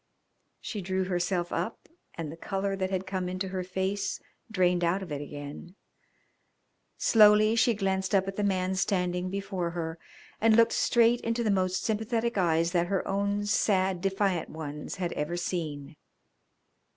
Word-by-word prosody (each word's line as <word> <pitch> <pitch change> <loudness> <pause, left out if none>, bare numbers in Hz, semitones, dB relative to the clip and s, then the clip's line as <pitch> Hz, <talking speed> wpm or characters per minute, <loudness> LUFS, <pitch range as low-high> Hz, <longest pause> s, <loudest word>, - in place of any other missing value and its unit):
She 210 - -5
drew 190 +1 -1
herself 175 -1 -1
up 225 - -3 0.3
and 160 -3 -5
the - - -8
colour 195 +3 -2
that 190 -1 -2
had 190 0 -2
come 185 -1 -3
into 185 +1 -3
her 185 -1 -3
face 190 +2 -2 0.3
drained 180 -4 +2
out 180 +3 +1
of 175 - -9
it 145 -1 -3
again. 145 +5 -8 1.2
Slowly 215 0 +6
she 230 0 +3
glanced 190 -1 0
up 190 0 +2
at 195 - -4
the 210 - -1
man 190 -2 +1
standing 180 -1 0
before 195 -2 -3
her, 165 0 -4 0.4
and 225 0 +5
looked 230 0 +5
straight 235 0 +3
into 230 +1 -1
the 215 - +2
most 185 -1 0
sympathetic 225 +1 -1
eyes 170 -3 +2
that 175 -1 +1
her 195 +1 -1
own 200 +1 0
sad, 190 -3 +1
defiant 195 -3 0
ones 150 -1 -6
had 180 -2 -3
ever 160 +4 -2
seen. 155 -4 -4
190 Hz, 160 wpm, -28 LUFS, 175-200 Hz, 1.2 s, Slowly